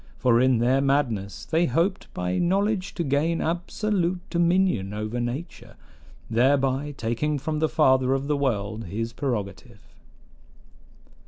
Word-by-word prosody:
For 120 -2 +3
in 130 -1 +4
their 125 +4 +2
madness 125 -8 -1
they 165 +2 +1
hoped 185 +5 -1
by 90 0 -1
knowledge 195 +2 0
to 170 - -1
gain 155 +4 +1
absolute 180 +2 -1
dominion 170 - +1
over 110 +3 -3
nature, 120 +8 -5 0.5
thereby 135 +4 +1
taking 120 +7 -1
from 150 +2 -3
the 160 0 +1
Father 130 -3 +3
of 135 0 -2
the 145 +1 0
world 110 -5 -2
his 115 +5 -4
prerogative. 105 -8 -5
135 Hz, 130 wpm, -25 LUFS, 115-165 Hz, 0.5 s, in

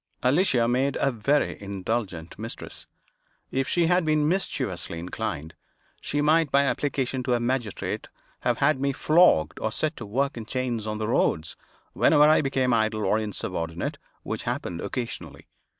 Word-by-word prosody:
Alicia 130 -3 +3
made 130 +3 +1
a 140 - +2
very 125 +4 0
indulgent 100 -3 -4
mistress. 115 +1 -6 0.6
If 135 0 0
she 175 -1 +2
had 180 +2 +3
been 155 -1 +2
mischievously 125 - -2
inclined, 80 -2 -4 0.5
she 145 - -1
might, 155 0 +3
by 140 0 +5
application 135 -2 -1
to 125 -1 +1
a - - 0
magistrate, 120 -3 -2 0.3
have - - 0
had 150 -3 +2
me 140 0 +1
flogged 150 - +4
or 110 - -1
set 155 +7 -1
to 115 - -7
work 135 +6 -1
in 110 -2 -6
chains 120 -4 -2
on 110 0 -2
the 110 0 -2
roads, 80 -8 +1 0.4
whenever 150 -2 +5
I 155 +1 +6
became 135 -3 +1
idle 110 -1 +1
or 110 - +2
insubordinate, 90 -5 -4 0.2
which - - -4
happened 85 -1 -3
occasionally. 125 -3 -5
125 Hz, 155 wpm, -26 LUFS, 105-145 Hz, 0.6 s, I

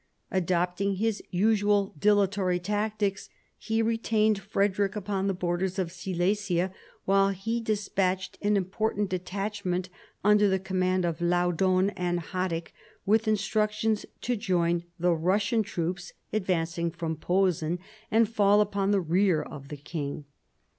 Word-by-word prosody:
Adopting 180 +2 0
his 220 +2 -1
usual 205 +1 +2
dilatory 200 -2 +3
tactics, 205 +1 -2 0.3
he 225 +1 0
retained 220 -2 +2
Frederick 200 +1 0
upon 200 -1 -2
the 195 - +1
borders 180 +1 -1
of 180 -3 -1
Silesia 185 +1 -1 0.3
while 195 0 +4
he 225 +5 -2
despatched 195 -4 -1
an 205 0 +2
important 200 +1 -1
detachment 185 0 -2 0.3
under 210 0 +5
the 190 - +2
command 185 -1 0
of 170 0 -2
Laudon 180 +2 +2
and 175 -2 -1
Haddick, 175 -1 -3 0.3
with 220 +2 +3
instructions 215 +1 0
to 245 - 0
join 175 -5 0
the 175 +1 +1
Eussian 200 +7 +1
troops 175 -1 -4 0.2
advancing 170 -4 0
from 165 -1 -4
Posen, 175 -1 +1 0.3
and 225 0 +4
fall 205 -2 +4
upon 200 -1 +1
the 200 -1 +3
rear 175 0 +2
of 140 -1 -10
the 150 - -7
king. 145 0 -5
190 Hz, 125 wpm, -28 LUFS, 175-205 Hz, 0.3 s, under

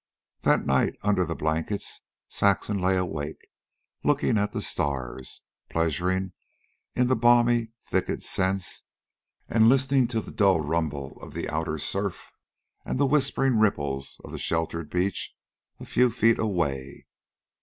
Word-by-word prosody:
That - - +2
night, 65 0 +2
under 100 -3 +2
the 80 0 -3
blankets, 80 +6 -2 0.3
Saxon 100 0 +1
lay 95 +1 +2
awake, 80 -4 -4 0.6
looking 145 -5 +2
at 105 0 +1
the - - -3
stars, 65 -2 -3 0.3
pleasuring 90 +3 0 0.6
in 125 - +3
the 130 +1 +3
balmy 120 -1 +4
thicket - - -1
scents, 95 -1 0 0.7
and 110 0 +5
listening 135 -1 +3
to 115 -1 -1
the - - -8
dull 95 -4 +3
rumble 75 -3 -2
of - - -11
the - - -3
outer 80 0 -2
surf 100 +5 -3 0.5
and - - -3
the 140 - +4
whispering 135 -3 +2
ripples 70 -10 0
on - - -10
the - - -6
sheltered 80 -1 -2
beach 90 +1 -1 0.4
a - - -8
few 125 0 +3
feet 115 0 +3
away. 70 -10 -2
95 Hz, 135 wpm, -26 LUFS, 80-115 Hz, 0.7 s, and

